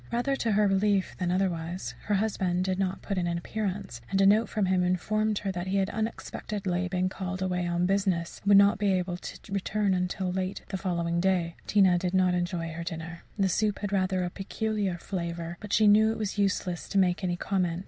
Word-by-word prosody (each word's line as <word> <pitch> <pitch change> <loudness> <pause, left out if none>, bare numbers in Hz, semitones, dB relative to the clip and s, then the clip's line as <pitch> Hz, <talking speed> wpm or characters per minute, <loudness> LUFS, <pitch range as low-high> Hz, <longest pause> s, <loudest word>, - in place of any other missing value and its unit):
Rather 245 +4 +1
to 230 -5 0
her 210 0 +4
relief 195 0 +1
than 180 -2 0
otherwise, 175 -7 -1
her 210 - +1
husband 190 -3 0
did 190 0 -1
not 190 0 -1
put 195 -2 -2
in 175 - 0
an 170 0 -1
appearance, 190 - -4
and 195 - +1
a 195 - +5
note 215 +3 +4
from 210 -3 0
him 185 -1 +2
informed 215 +4 +1
her 200 -2 -2
that 175 0 -4
he 195 +1 0
had 195 0 +1
unexpectedly 205 -4 -3
been 185 0 0
called 185 0 -4
away 180 -1 -1
on 175 +1 +1
business 190 -3 0
and 200 - -2
would 200 - +8
not 200 0 +5
be 200 -2 +2
able 180 -1 -1
to 180 - -8 0.2
return 195 -2 +1
till 185 0 -3
late 185 +1 -3
the 195 - -3
following 170 -2 -1
day. 175 -2 +1
Tina 190 -4 +4
did 180 +1 -1
not 185 -1 +4
enjoy 175 -1 -1
her 170 +1 -5
dinner. 170 0 -6 0.2
The 195 -2 +3
soup 210 +3 +1
had 205 -1 -4
rather 185 -2 +1
a 175 - -4
peculiar 205 -1 -2
flavour, 170 -2 -4
but 210 - -8
she 215 - +4
knew 215 +2 +6
it 225 - -3
was 210 -2 -3
useless 190 -3 -1
to 200 - -1
make 185 0 +2
any 175 -1 0
comment. 180 -3 -1
190 Hz, 220 wpm, -28 LUFS, 175-200 Hz, 0.2 s, would